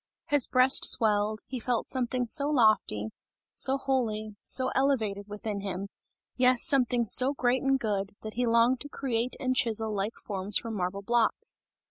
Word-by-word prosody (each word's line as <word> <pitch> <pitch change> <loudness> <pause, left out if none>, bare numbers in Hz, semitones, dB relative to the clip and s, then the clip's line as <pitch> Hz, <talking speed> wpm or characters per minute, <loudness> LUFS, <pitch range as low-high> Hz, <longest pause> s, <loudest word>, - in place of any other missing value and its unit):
His 290 -4 +3
breast 255 +1 +4
swelled, 215 -1 +2
he 260 - -6
felt 240 0 -2
something 250 -1 -1
so 280 +4 +1
lofty, 215 - +1 0.4
so 270 +1 +3
holy, 225 -6 -2
so 255 0 0
elevated 220 -7 -1
within 210 0 -5
him, 195 0 -5 0.5
yes, 255 -1 +3
something 250 -5 +2
so 260 +6 +4
great 250 0 0
and 270 0 +1
good, 205 -3 -3
that 215 0 -7
he 245 0 -1
longed 235 +2 +2
to 290 - -8
create 250 -3 -3
and 255 -1 -1
chisel 225 -3 0
like 205 +3 -3
forms 195 0 -1
from 230 - -6
marble 195 0 -4
blocks. 240 - -1
235 Hz, 160 wpm, -27 LUFS, 210-255 Hz, 0.5 s, breast